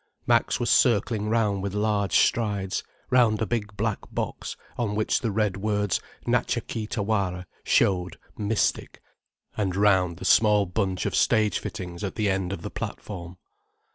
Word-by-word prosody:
Max -, -, +2 dB
was -, -, +1 dB
circling 105 Hz, -2 st, +3 dB
round 105 Hz, -4 st, +1 dB
with 100 Hz, 0 st, -4 dB
large 105 Hz, -3 st, 0 dB
strides, 100 Hz, -4 st, +1 dB, 0.3 s
round 120 Hz, -4 st, +4 dB
a 110 Hz, -, 0 dB
big 105 Hz, -3 st, -3 dB
black 110 Hz, 0 st, -1 dB
box -, -, -4 dB, 0.2 s
on 110 Hz, -4 st, -2 dB
which 110 Hz, 0 st, +1 dB
the 115 Hz, -, 0 dB
red 105 Hz, -2 st, 0 dB
words 105 Hz, -1 st, 0 dB, 0.2 s
Natcha -, -, 0 dB
Kee 110 Hz, -2 st, -4 dB
Tawara 100 Hz, -5 st, -1 dB, 0.2 s
showed 90 Hz, -3 st, +2 dB, 0.2 s
mystic, 105 Hz, +1 st, -1 dB, 0.6 s
and 95 Hz, -4 st, -1 dB
round 95 Hz, -4 st, +3 dB
the -, -, -7 dB
small 105 Hz, -2 st, +5 dB
bunch 95 Hz, 0 st, -1 dB
of -, -, -1 dB
stage 110 Hz, -1 st, +3 dB
fittings 90 Hz, -1 st, -6 dB
at 100 Hz, -, -3 dB
the 105 Hz, -3 st, +1 dB
end 95 Hz, -1 st, -1 dB
of 85 Hz, -4 st, -5 dB
the -, -, -5 dB
platform. 90 Hz, -3 st, -6 dB
105 Hz, 155 wpm, -26 LUFS, 95-110 Hz, 0.6 s, small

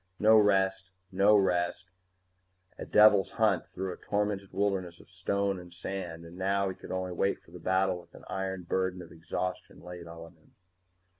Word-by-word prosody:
No 110 Hz, +1 st, +6 dB
rest, 95 Hz, -2 st, +3 dB, 0.2 s
no 100 Hz, +3 st, +5 dB
rest, 90 Hz, -1 st, 0 dB, 0.8 s
a -, -, -8 dB
devil's 105 Hz, -2 st, +5 dB
hunt 105 Hz, -6 st, +2 dB
through 95 Hz, -1 st, -4 dB
a -, -, -11 dB
tormented 100 Hz, -1 st, -2 dB
wilderness 95 Hz, -3 st, -1 dB
of -, -, -18 dB
stone 100 Hz, +1 st, -1 dB
and 90 Hz, 0 st, -12 dB
sand, 85 Hz, -2 st, -6 dB
and 85 Hz, +2 st, -12 dB
now 100 Hz, +1 st, +1 dB
he 95 Hz, -, -5 dB
could -, -, -11 dB
only 95 Hz, 0 st, -2 dB
wait 95 Hz, +3 st, 0 dB
for -, -, -20 dB
the 90 Hz, -, -10 dB
battle 95 Hz, +1 st, +1 dB
with -, -, -21 dB
an -, -, -13 dB
iron 95 Hz, -1 st, -3 dB
burden 95 Hz, +1 st, -1 dB
of 85 Hz, -, -14 dB
exhaustion 85 Hz, +2 st, -5 dB
laid 90 Hz, -1 st, -9 dB
on 85 Hz, +1 st, -10 dB
him. 80 Hz, -2 st, -28 dB
95 Hz, 175 wpm, -30 LUFS, 90-100 Hz, 0.8 s, No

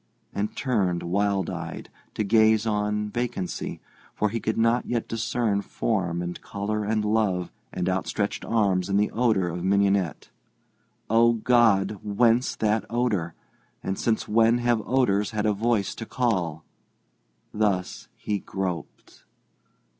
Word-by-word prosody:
and 105 Hz, +1 st, -2 dB
turned, 100 Hz, -9 st, 0 dB
wild 100 Hz, 0 st, 0 dB
eyed, 85 Hz, -3 st, -6 dB, 0.3 s
to 110 Hz, -, 0 dB
gaze 110 Hz, +1 st, +4 dB
on 105 Hz, -1 st, 0 dB
vacancy, 120 Hz, -7 st, -3 dB, 0.4 s
for 105 Hz, -, +1 dB
he 115 Hz, +3 st, -2 dB
could 110 Hz, 0 st, -2 dB
not 115 Hz, +2 st, +2 dB
yet 120 Hz, -2 st, -1 dB
discern 115 Hz, -2 st, 0 dB
form 90 Hz, -6 st, -1 dB
and 90 Hz, 0 st, -5 dB
colour 105 Hz, +1 st, -3 dB
and 105 Hz, 0 st, 0 dB
love 105 Hz, -5 st, +1 dB, 0.2 s
and 90 Hz, -1 st, -2 dB
outstretched 95 Hz, +2 st, -1 dB
arms 100 Hz, -5 st, +1 dB
in 100 Hz, -, +2 dB
the 105 Hz, +1 st, +2 dB
odour 110 Hz, -6 st, +2 dB
of 85 Hz, +1 st, -4 dB
mignonette. 100 Hz, -3 st, +1 dB, 0.8 s
Oh, 115 Hz, +1 st, +4 dB
God! 110 Hz, -4 st, +3 dB
whence 115 Hz, +4 st, +2 dB
that 110 Hz, 0 st, +1 dB
odour, 105 Hz, -9 st, -1 dB, 0.5 s
and 95 Hz, -, -2 dB
since 110 Hz, +1 st, -1 dB
when 115 Hz, +2 st, +4 dB
have 120 Hz, -2 st, +1 dB
odours 105 Hz, -6 st, +2 dB
had 105 Hz, -1 st, -1 dB
a 105 Hz, -, +3 dB
voice 110 Hz, -1 st, 0 dB
to 115 Hz, -, -8 dB
call? 90 Hz, -11 st, -1 dB, 0.9 s
Thus 100 Hz, -4 st, -1 dB
he 105 Hz, -1 st, -2 dB
groped. 90 Hz, -5 st, -6 dB
105 Hz, 135 wpm, -25 LUFS, 95-115 Hz, 0.9 s, gaze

